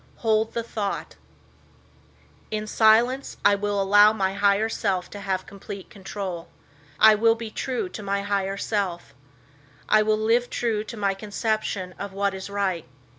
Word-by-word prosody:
Hold 220 Hz, 0 st, +2 dB
the 235 Hz, -, -1 dB
thought: 210 Hz, -3 st, -4 dB, 1.3 s
In 215 Hz, 0 st, -3 dB
silence 230 Hz, +5 st, +3 dB
I 205 Hz, -, +7 dB
will 205 Hz, 0 st, -1 dB
allow 205 Hz, +2 st, +6 dB
my 195 Hz, -3 st, -1 dB
higher 200 Hz, +2 st, +2 dB
self 195 Hz, -5 st, -2 dB
to 205 Hz, -, -7 dB
have 195 Hz, -2 st, -2 dB
complete 195 Hz, 0 st, -9 dB
control. 195 Hz, -3 st, -6 dB, 0.5 s
I 220 Hz, 0 st, +8 dB
will 225 Hz, +2 st, +4 dB
be 230 Hz, -1 st, -7 dB
true 260 Hz, -, -2 dB
to 220 Hz, -, -8 dB
my 200 Hz, 0 st, -2 dB
higher 200 Hz, -1 st, -1 dB
self. 190 Hz, -9 st, -2 dB, 0.7 s
I 215 Hz, -, +5 dB
will 215 Hz, 0 st, +2 dB
live 230 Hz, +3 st, +2 dB
true 225 Hz, -3 st, -1 dB
to 220 Hz, +2 st, -8 dB
my 200 Hz, -2 st, +1 dB
conception 205 Hz, -2 st, -3 dB
of 200 Hz, -1 st, -6 dB
what 200 Hz, 0 st, 0 dB
is 190 Hz, +1 st, -7 dB
right. 190 Hz, -7 st, -2 dB
205 Hz, 155 wpm, -25 LUFS, 195-220 Hz, 1.3 s, I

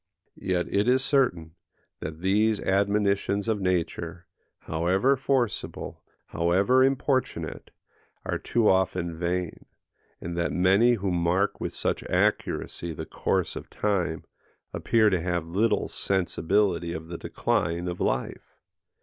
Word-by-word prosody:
Yet 90 Hz, -2 st, 0 dB
it 100 Hz, +3 st, +2 dB
is 130 Hz, +1 st, +3 dB
certain, 90 Hz, -, +1 dB, 0.5 s
that 80 Hz, +1 st, -7 dB
these 105 Hz, +3 st, +2 dB
admonitions 100 Hz, +1 st, +1 dB
of 110 Hz, -3 st, 0 dB
nature, 85 Hz, -1 st, -2 dB, 0.4 s
however 95 Hz, +12 st, +1 dB
forcible, 130 Hz, -4 st, -2 dB, 0.2 s
however 95 Hz, +10 st, +3 dB
importunate, 135 Hz, 0 st, -1 dB, 0.6 s
are -, -, -2 dB
too 115 Hz, -3 st, +1 dB
often 90 Hz, -2 st, +1 dB
vain; 90 Hz, 0 st, -3 dB, 0.5 s
and 85 Hz, 0 st, -5 dB
that 85 Hz, 0 st, 0 dB
many 95 Hz, +7 st, +4 dB
who 100 Hz, -4 st, -1 dB
mark 90 Hz, +3 st, +1 dB
with -, -, -4 dB
such -, -, -1 dB
accuracy 85 Hz, -1 st, -1 dB
the -, -, -6 dB
course -, -, -1 dB
of -, -, -8 dB
time, 90 Hz, -6 st, -1 dB, 0.5 s
appear 110 Hz, -2 st, +3 dB
to 90 Hz, -3 st, +1 dB
have 85 Hz, -1 st, -1 dB
little 100 Hz, +7 st, +1 dB
sensibility 90 Hz, -1 st, 0 dB
of 80 Hz, 0 st, -6 dB
the 85 Hz, 0 st, -7 dB
decline 85 Hz, +2 st, -1 dB
of 90 Hz, 0 st, -4 dB
life. 65 Hz, -, -2 dB
95 Hz, 125 wpm, -26 LUFS, 85-105 Hz, 0.6 s, many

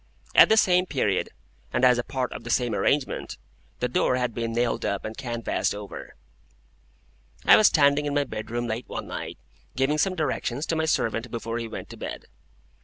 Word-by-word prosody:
At -, -, +8 dB
the 220 Hz, -, +5 dB
same 180 Hz, -3 st, +4 dB
period, 105 Hz, -, 0 dB, 0.4 s
and 130 Hz, -, +2 dB
as 125 Hz, -1 st, +5 dB
a -, -, -1 dB
part 130 Hz, -1 st, -3 dB
of -, -, -8 dB
the 120 Hz, -, -8 dB
same 120 Hz, -1 st, +1 dB
arrangement,—the 130 Hz, -2 st, -2 dB
door 125 Hz, +1 st, +1 dB
had 125 Hz, -2 st, -1 dB
been 115 Hz, 0 st, -3 dB
nailed 120 Hz, +1 st, 0 dB
up 100 Hz, -, -2 dB
and 110 Hz, 0 st, -5 dB
canvased 120 Hz, -6 st, -2 dB
over. 105 Hz, -1 st, -9 dB, 1.3 s
I -, -, +9 dB
was 215 Hz, -, +6 dB
standing 145 Hz, -1 st, +3 dB
in 145 Hz, -, -2 dB
my 145 Hz, -, +3 dB
bedroom 120 Hz, -1 st, -4 dB
late 115 Hz, +1 st, -4 dB
one -, -, -5 dB
night, -, -, -6 dB, 0.4 s
giving 135 Hz, +4 st, +1 dB
some 185 Hz, +4 st, +1 dB
directions 150 Hz, -3 st, -2 dB
to 165 Hz, -, -1 dB
my 160 Hz, 0 st, 0 dB
servant 115 Hz, -5 st, 0 dB
before 115 Hz, 0 st, -4 dB
he 115 Hz, -, -4 dB
went 110 Hz, -, -7 dB
to -, -, -10 dB
bed. -, -, -6 dB
125 Hz, 185 wpm, -25 LUFS, 115-145 Hz, 1.3 s, I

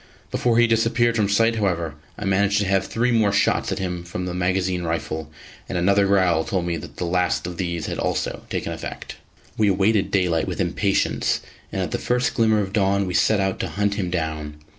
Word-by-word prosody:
Before 120 Hz, -2 st, +1 dB
he 120 Hz, -, +6 dB
disappeared 115 Hz, +1 st, +2 dB
from 105 Hz, -3 st, +1 dB
sight, 115 Hz, +3 st, +3 dB
however, 85 Hz, -7 st, -1 dB, 0.2 s
I 105 Hz, -, -5 dB
managed 100 Hz, +1 st, +2 dB
to 105 Hz, -, +1 dB
have 95 Hz, 0 st, +1 dB
three 120 Hz, +2 st, 0 dB
more 110 Hz, -3 st, +3 dB
shots 105 Hz, -, +1 dB
at -, -, -1 dB
him 90 Hz, -2 st, -3 dB
from 85 Hz, +1 st, -5 dB
the 90 Hz, -, -3 dB
magazine 90 Hz, 0 st, 0 dB
rifle, 80 Hz, -2 st, -3 dB, 0.4 s
and -, -, -2 dB
another 100 Hz, +3 st, +3 dB
growl 90 Hz, -5 st, +3 dB
told 90 Hz, -1 st, -2 dB
me 85 Hz, -1 st, -1 dB
that 80 Hz, -4 st, -10 dB
the 90 Hz, -, -2 dB
last 90 Hz, 0 st, 0 dB
of 90 Hz, -1 st, -5 dB
these 85 Hz, -3 st, -2 dB
had -, -, -4 dB
also -, -, -2 dB
taken -, -, -3 dB
effect. -, -, -7 dB, 0.4 s
We 105 Hz, -, +4 dB
awaited 100 Hz, +1 st, +2 dB
daylight 90 Hz, -5 st, +1 dB
with -, -, -4 dB
impatience, -, -, +1 dB, 0.3 s
and -, -, -1 dB
at -, -, -4 dB
the -, -, -2 dB
first 125 Hz, 0 st, 0 dB
glimmer 110 Hz, -2 st, +3 dB
of 95 Hz, -1 st, -4 dB
dawn 100 Hz, -1 st, +2 dB
we 90 Hz, -, -3 dB
set 110 Hz, +3 st, +3 dB
out 95 Hz, -1 st, -1 dB
to -, -, -1 dB
hunt 100 Hz, 0 st, 0 dB
him 100 Hz, -3 st, -2 dB
down. 80 Hz, -3 st, -3 dB
95 Hz, 210 wpm, -23 LUFS, 90-105 Hz, 0.4 s, he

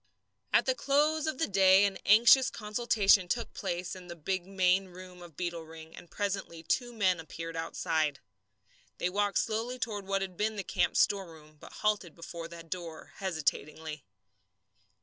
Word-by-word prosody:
At -, -, +4 dB
the -, -, +2 dB
close 305 Hz, -, +1 dB
of 310 Hz, -, -2 dB
the 325 Hz, -, +1 dB
day 190 Hz, 0 st, +5 dB
an 195 Hz, -1 st, -2 dB
anxious 240 Hz, +5 st, +7 dB
consultation 210 Hz, -3 st, +2 dB
took 235 Hz, +5 st, -2 dB
place 180 Hz, -1 st, -4 dB
in 180 Hz, -1 st, -11 dB
the 170 Hz, -, -7 dB
big 185 Hz, +3 st, -3 dB
main 190 Hz, 0 st, +2 dB
room 180 Hz, 0 st, -12 dB
of 170 Hz, -4 st, -13 dB
Beetle 175 Hz, -2 st, -3 dB
Ring, 160 Hz, 0 st, -12 dB
and 175 Hz, -, -13 dB
presently 195 Hz, -4 st, -3 dB
two 245 Hz, +8 st, 0 dB
men 190 Hz, -6 st, +1 dB
appeared 165 Hz, +1 st, -7 dB
outside. 160 Hz, -2 st, -1 dB, 0.8 s
They 175 Hz, -, 0 dB
walked 205 Hz, +1 st, +1 dB
slowly 230 Hz, +3 st, -1 dB
toward 210 Hz, -6 st, -4 dB
what 195 Hz, 0 st, 0 dB
had 185 Hz, -2 st, -6 dB
been 215 Hz, +1 st, 0 dB
the 200 Hz, -, -3 dB
camp's -, -, +1 dB
storeroom, 160 Hz, -6 st, -2 dB
but -, -, -12 dB
halted 205 Hz, -6 st, 0 dB
before 170 Hz, 0 st, -7 dB
the 170 Hz, 0 st, -10 dB
door 165 Hz, -1 st, -7 dB
hesitatingly. 160 Hz, -4 st, -3 dB
185 Hz, 165 wpm, -30 LUFS, 165-210 Hz, 0.8 s, anxious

